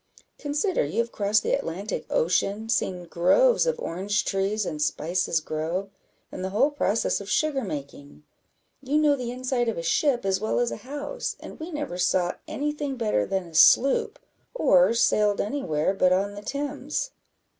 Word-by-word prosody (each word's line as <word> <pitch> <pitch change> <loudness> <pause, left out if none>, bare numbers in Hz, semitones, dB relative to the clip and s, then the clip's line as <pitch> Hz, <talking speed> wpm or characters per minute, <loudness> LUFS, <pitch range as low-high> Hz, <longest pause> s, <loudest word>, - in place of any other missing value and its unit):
Consider, 295 +6 0
you 150 +9 -5
have 235 0 0
crossed 205 +1 +1
the - - 0
Atlantic 195 +6 -3
Ocean, 195 +6 0
seen 185 -5 0
groves 330 - +3
of 485 -1 +1
orange 200 +5 -1
trees 195 +2 0
and 150 -3 -4
spices 165 +3 0
grow, 165 +5 -3 0.4
and 185 - -6
the 190 - -2
whole 220 +10 +2
process 230 -8 0
of 200 - -9
sugar 290 -1 +1
making. 145 -4 -8 0.6
You 280 +2 0
know 300 -2 +4
the 250 -3 -5
inside 250 -1 -1
of 225 - -3
a 170 - -3
ship 245 - +1
as 190 -1 +1
well 220 - 0
as 240 -1 +1
a - - -4
house, 290 - -5
and - - -11
we 320 +2 -6
never 290 - -4
saw 180 -1 +1
any 295 +1 -2
thing 290 -2 -4
better 215 - 0
than 190 -2 -2
a 170 - -14
sloop, 430 - +5 0.4
or 200 - +4
sailed 210 -3 +2
any 280 +7 -2
where 155 - 0
but 185 -2 +3
on 195 +2 +1
the 205 - -8
Thames." 285 - -3
210 Hz, 175 wpm, -25 LUFS, 185-280 Hz, 0.6 s, sloop